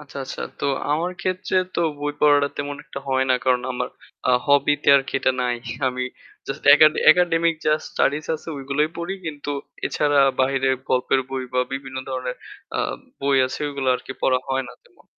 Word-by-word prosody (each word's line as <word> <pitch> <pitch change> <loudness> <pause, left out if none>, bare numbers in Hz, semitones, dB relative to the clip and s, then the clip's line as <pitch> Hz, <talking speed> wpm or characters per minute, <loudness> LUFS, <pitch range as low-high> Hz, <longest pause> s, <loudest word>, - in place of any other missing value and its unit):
আচ্ছা, 145 -1 -13
আচ্ছা। - - -6 0.2
তো - - -3 0.3
আমার 165 +4 0
ক্ষেত্রে 185 0 -1 0.2
তো - - 0 0.2
বই 145 0 -1
পড়াটা 145 -1 +5
তেমন 145 0 -4
একটা - - -7
হয় 130 0 +2
না। - - +6
কারণ 125 -1 +2
আমার 125 - -3 0.4
আ - - +5 0.2
hobby 140 0 +4
তে - - +1
আরকি 135 0 -1
এটা 130 - +2
নাই। 125 -1 0 0.3
আমি 125 0 -1 0.4
just - - -5
একাডে 155 0 +5
একাডেমিক 170 -1 +2
যা 155 - +5 0.2
studies 150 +2 0
আছে 155 - -9
ওইগুলোই 140 +2 0
পড়ি। 170 +3 -3
কিন্তু 145 -2 -5 0.4
এছাড়া 145 -1 +1 0.2
বাহিরে 135 0 +2 0.2
গল্পের 130 +1 +2
বই 130 -1 -3
বা 125 - +3
বিভিন্ন 135 -1 -5
ধরনের 130 -1 -3 0.4
আ - - -1 0.4
বই 140 0 +2
আছে 130 - -6
ওইগুলা 140 -2 -2
আরকি 135 - -8
পড়া 130 -1 +3
হয় 135 0 0
না - - -10
তেমন। - - -25
140 Hz, 180 wpm, -22 LUFS, 130-150 Hz, 0.4 s, না